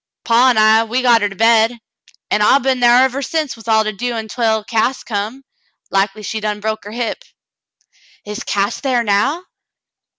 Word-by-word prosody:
Paw 240 +2 +4
an* 245 - +1
I, 220 +1 +5
we 245 +3 -2
got 235 -2 +4
her 205 - 0
to 195 - -11
bed, 225 +2 +3 0.5
an' 210 - +1
I 210 +6 +5
been 265 -1 -1
thar 245 +1 +5
ever 265 +1 -1
since 310 0 -3
with 225 -1 -16
all 220 -1 +3
to 215 - -2
do 240 +5 -3
ontwell 220 -1 -1
Cass 225 +5 -1
come. 220 +5 -5 0.5
Likely 195 +2 -1
she 220 +2 -4
done 210 -1 -3
broke 220 0 -4
her 205 - -8
hip." 240 - -4 1.0
"Is 210 +4 -6
Cass 200 0 -1
thar 255 -4 0
now 235 - 0
225 Hz, 185 wpm, -17 LUFS, 210-250 Hz, 1.0 s, I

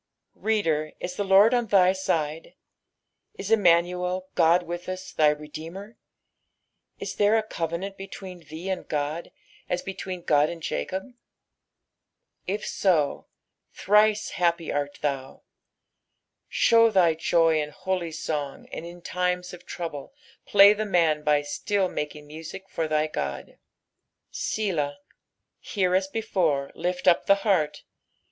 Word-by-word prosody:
i^oder, 165 -9 0
is 180 - -4
the 205 - -1
Lord 200 +4 +6
on 240 -2 +1
thj 190 -2 +4
side? 160 -4 -2 0.8
Is 200 +2 -6
Emmuiuel, 180 -2 +3
God 170 +1 +4
witb 175 +1 -5
tis, 185 0 -6
thy 150 -1 +4
Redeemei 160 +7 -9
I - - -31 1.0
Is - - -5
there 210 +2 +4
a 220 - +1
covenant 175 0 -4
between 190 -1 -9
thee 165 +2 -9
and 190 -1 -3
God 150 +3 -3 0.4
n 180 - +1
between 185 -2 -5
Ood 150 -2 +3
and 170 - -6
Jacob! 190 +9 -4 1.3
If 205 +3 -2
so, 165 -7 +1 0.5
thrice 210 +1 +3
happj 170 -2 0
art 145 0 -2
thuu. 135 -2 -3 1.1
Show 230 0 +5
thy 180 -6 +4
joy 165 -1 +2
in 150 - -4
hoiy 180 +3 -3
toa^ 150 -3 -4
tuid - - -5
in 175 0 -10
times 180 0 -1
of 180 0 -12
tronble 165 - -6 0.3
play 200 0 +8
the 215 +1 -2
man 165 -7 +2
by 150 -1 +3
stilt 190 +5 -1
loakinf 150 0 -5
music 160 +5 -9
for 160 - -1
thy 155 0 +1
God. 70 - -5 0.7
Selah. 165 -10 -2 0.6
Here 185 -3 -1
as 190 +1 +2
before, 180 -10 -1
lift 180 +1 -3
up 170 - +4
the 200 - +7
heart. 155 -7 +1
175 Hz, 135 wpm, -26 LUFS, 155-195 Hz, 1.3 s, play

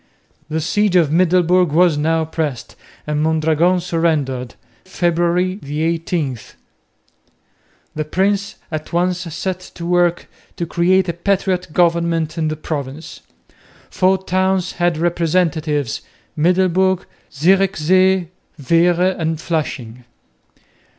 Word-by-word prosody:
The 160 +1 -1
siege 200 +3 +1
of 165 -5 +4
Middelburg 180 0 +3
was 170 +1 +4
now 160 +2 +1
pressed 155 -6 -4 0.3
and 150 0 -1
Mondragon 160 +3 +2
surrendered, 155 -8 -1 0.3
February 175 +1 0
18. 155 -2 -2 1.5
The 155 0 -3
prince 200 +5 0 0.2
at 155 -1 -5
once 180 +1 0
set 185 +2 -4 0.2
to 170 - -7
work 175 0 +1 0.3
to 170 - -3
create 185 +3 +2
a 170 - -1
patriot 185 0 -1
government 170 -2 +1
in 160 -2 -1
the 155 0 -3
province. 145 0 -6 0.7
Four 190 +1 +2
towns 190 0 0
had 175 -2 0
representatives, 160 -6 0 0.3
Middelburg, 185 +3 +2 0.3
Zierikzee, 185 +2 +2 0.3
Veere 175 +5 +2
and 160 -1 -1
Flushing. 130 -8 -4
170 Hz, 105 wpm, -18 LUFS, 155-185 Hz, 1.5 s, of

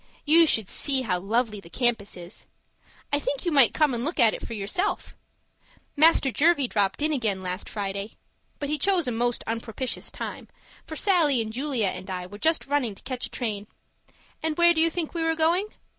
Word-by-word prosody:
You 325 +2 +6
should 220 -8 +2
see 270 +3 +1
how 180 -6 -1
lovely 215 +2 -1
the 170 - -14
campus 230 -3 +1
is. 175 0 -9 0.7
I 285 - +3
think 285 +1 -3
you 345 - +1
might 275 -5 +5
come 300 -4 +2
and 235 0 -3
look 315 +3 -2
at 230 -3 +6
it - - -6
for 230 - -6
yourself. 215 - -2 0.8
Master 305 -3 +5
Jervie 290 -1 +3
dropped 205 +5 0
in 310 0 +1
again 220 -8 0
last 180 +1 -4
Friday 200 0 -4 0.4
but 285 - -4
he 300 +1 -1
chose 365 -2 +2
a - - 0
most 240 +1 -1
unpropitious 230 +2 -3
time, - - -7 0.4
for 315 - -6
Sallie 320 - +3
and 220 -1 -3
Julia 255 -5 0
and 185 +1 -7
I 180 -1 -4
were 205 +3 -11
just 320 +4 +1
running 275 -7 0
to - - -17
catch 255 -2 -4
a - - -19
train. 210 -4 -4 0.7
And 315 -1 -2
where 345 0 +6
do 320 - +1
you 330 - +4
think 330 -1 -3
we 335 - -2
were 325 0 +1
going? 335 +5 +2
255 Hz, 205 wpm, -25 LUFS, 210-315 Hz, 0.8 s, You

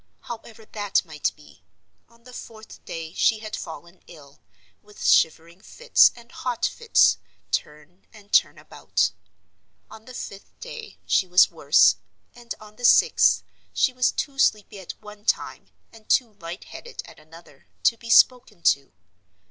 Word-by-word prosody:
However 225 -3 -10
that 205 -3 -1
might 155 -3 -2
be, 150 - -20 0.5
on 235 0 -25
the 250 +1 -14
fourth 220 -2 -12
day 165 -1 -7
she 220 - +2
had 215 0 -7
fallen 170 +2 -10
ill, 145 -4 -16 0.4
with 210 0 -11
shivering 165 +3 +2
fits - - +4
and 235 0 -16
hot 245 -2 -3
fits, 465 -1 +3 0.3
turn 150 +5 -5
and 210 -2 -18
turn - - +4
about. - - -2 0.8
On 220 0 -13
the 255 - -11
fifth 200 -3 -9
day 475 -3 -10
she 190 - +2
was 180 +1 +5
worse; - - +4 0.4
and 240 -1 -8
on 215 0 -15
the 245 - -13
sixth, - - +5 0.3
she 260 - +2
was 250 0 +2
too 275 -2 -5
sleepy 210 -5 +1
at 185 - -9
one 210 0 -13
time, - - -2 0.3
and 225 -1 -18
too 235 -4 +2
light 175 -2 -9
headed 475 - -10
at - - -15
another, 155 -3 -18 0.2
to 230 - +4
be 230 0 -12
spoken 245 -6 +4
to. 140 -1 +2
210 Hz, 155 wpm, -24 LUFS, 170-235 Hz, 0.8 s, was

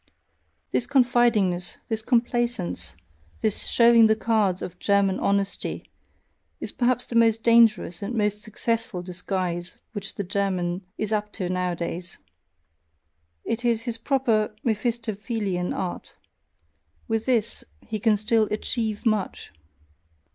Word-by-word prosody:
This 245 - 0
confidingness, 240 -9 +3
this 225 -1 -2
complaisance, 240 -4 0 0.5
this 215 -2 0
showing 235 -1 +6
the 220 - +4
cards 215 -5 +1
of 180 0 -7
German 200 -2 +2
HONESTY, 200 0 -1 0.7
is - - -4
probably 250 0 +1
the 235 - -6
most 225 -1 +4
dangerous 225 -6 +4
and 210 +4 -3
most 210 -1 0
successful 225 -2 -2
disguise 180 -1 -3
which 205 -3 -4
the 200 - -3
German 185 -1 -1
is 215 0 -2
up 210 0 -1
to 185 -4 -3
nowadays: 180 -1 -3 1.3
it 230 +2 -2
is 230 -2 +1
his 235 -2 -3
proper 225 -5 +1
Mephistophelean 220 -4 -1
art; 180 -2 -4 0.9
with 225 +1 -1
this 230 -3 +1 0.2
he 215 - -4
can 215 0 +3
"still 215 +1 +2
achieve 215 +1 -2
much"! 215 -4 -1
215 Hz, 120 wpm, -25 LUFS, 190-230 Hz, 1.3 s, showing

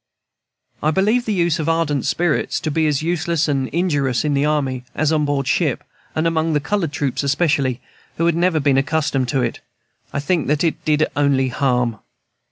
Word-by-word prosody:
I 155 - +2
believe 215 +9 +2
the 220 - -1
use 170 -3 +1
of 155 0 -1
ardent 165 -4 0
spirits 175 -3 0
to 155 - -2
be 160 +1 +1
as 150 0 0
useless 170 -1 0
and 135 -3 0
injurious 145 -7 0
in 150 - +1
the 140 +1 +2
army 135 -4 -1
as 155 0 +1
on 155 -2 +2
board 140 -2 -1
ship, - - 0 0.3
and 155 - 0
among 165 -1 +1
the 150 - +2
colored 170 0 -1
troops, 140 -4 -2
especially, 140 -3 +1 0.4
who 165 - +1
had 170 - +3
never 170 -1 +2
been 140 -2 +3
accustomed 145 -2 0
to 130 0 +1
it, 115 - -2 0.5
I - - -2
think 160 +2 0
that 150 +2 +1
it 165 - -1
did 155 0 +3
only 140 -2 +2
harm. 125 -4 0
150 Hz, 190 wpm, -20 LUFS, 140-165 Hz, 0.5 s, had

